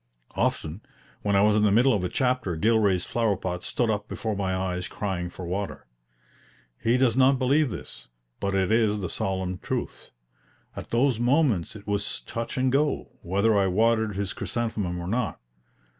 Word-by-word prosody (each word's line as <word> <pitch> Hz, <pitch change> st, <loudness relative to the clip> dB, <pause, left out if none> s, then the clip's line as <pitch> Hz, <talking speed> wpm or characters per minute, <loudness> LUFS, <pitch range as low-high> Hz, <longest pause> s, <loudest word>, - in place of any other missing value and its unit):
Often 80 Hz, +6 st, -1 dB, 0.4 s
when 100 Hz, -1 st, +1 dB
I 100 Hz, -, +5 dB
was 105 Hz, 0 st, +4 dB
in 105 Hz, -, +3 dB
the 105 Hz, -1 st, +4 dB
middle 125 Hz, +5 st, +5 dB
of 100 Hz, -, 0 dB
a 90 Hz, -, -1 dB
chapter 125 Hz, -8 st, 0 dB
Gilray's 105 Hz, -2 st, +2 dB
flower 115 Hz, -4 st, 0 dB
pot 90 Hz, -1 st, -4 dB
stood 120 Hz, -3 st, 0 dB
up 105 Hz, -1 st, -3 dB
before 110 Hz, -2 st, -3 dB
my 95 Hz, -2 st, -1 dB
eyes 90 Hz, -1 st, -2 dB
crying 90 Hz, -4 st, -3 dB
for 90 Hz, +1 st, -8 dB
water. 95 Hz, +3 st, -4 dB, 1.0 s
He 115 Hz, +2 st, +3 dB
does 125 Hz, -3 st, +3 dB
not 135 Hz, +1 st, +5 dB
believe 140 Hz, +3 st, +2 dB
this, -, -, -8 dB, 0.3 s
but 100 Hz, 0 st, -1 dB
it 95 Hz, +1 st, +1 dB
is 110 Hz, -2 st, +2 dB
the 90 Hz, -, -4 dB
solemn 95 Hz, -1 st, -2 dB
truth. -, -, -4 dB, 0.7 s
At -, -, -7 dB
those 120 Hz, 0 st, +2 dB
moments 120 Hz, -, +2 dB
it 105 Hz, -1 st, -11 dB
was 105 Hz, 0 st, -1 dB
touch 115 Hz, +2 st, -5 dB
and 130 Hz, 0 st, +2 dB
go, 145 Hz, +2 st, +1 dB
whether 100 Hz, +5 st, +2 dB
I 100 Hz, -1 st, +3 dB
watered 110 Hz, +2 st, +2 dB
his 100 Hz, -1 st, -2 dB
chrysanthemum 110 Hz, -7 st, -2 dB
or 85 Hz, -, -5 dB
not. 115 Hz, +4 st, -1 dB
105 Hz, 175 wpm, -26 LUFS, 95-120 Hz, 1.0 s, I